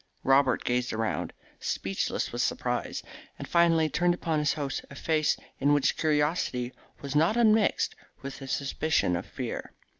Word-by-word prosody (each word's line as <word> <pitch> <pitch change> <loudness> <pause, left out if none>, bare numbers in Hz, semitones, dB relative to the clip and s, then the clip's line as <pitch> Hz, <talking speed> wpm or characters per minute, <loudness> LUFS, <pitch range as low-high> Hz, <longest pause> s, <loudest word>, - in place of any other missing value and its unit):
Robert 135 0 +4
gazed 125 0 0
around, 110 0 -2 0.3
speechless 95 0 -2
with - - -2
surprise, - - -1 0.3
and - - -7
finally 165 -2 +4
turned 175 +3 +2
upon 165 -3 -1
his 150 -1 +2
host 145 -3 -3
a 140 - -11
face 155 0 +1 0.2
in 145 +2 +3
which 145 -2 +2
curiosity 150 -5 0 0.3
was 140 0 -5
not 165 +9 +3
un 225 -3 +6
mixed 215 -2 +2 0.3
with 140 +1 -7
a 135 - -7
suspicion 140 - 0
of 85 - -4
fear. - - -5
145 Hz, 155 wpm, -28 LUFS, 135-165 Hz, 0.3 s, un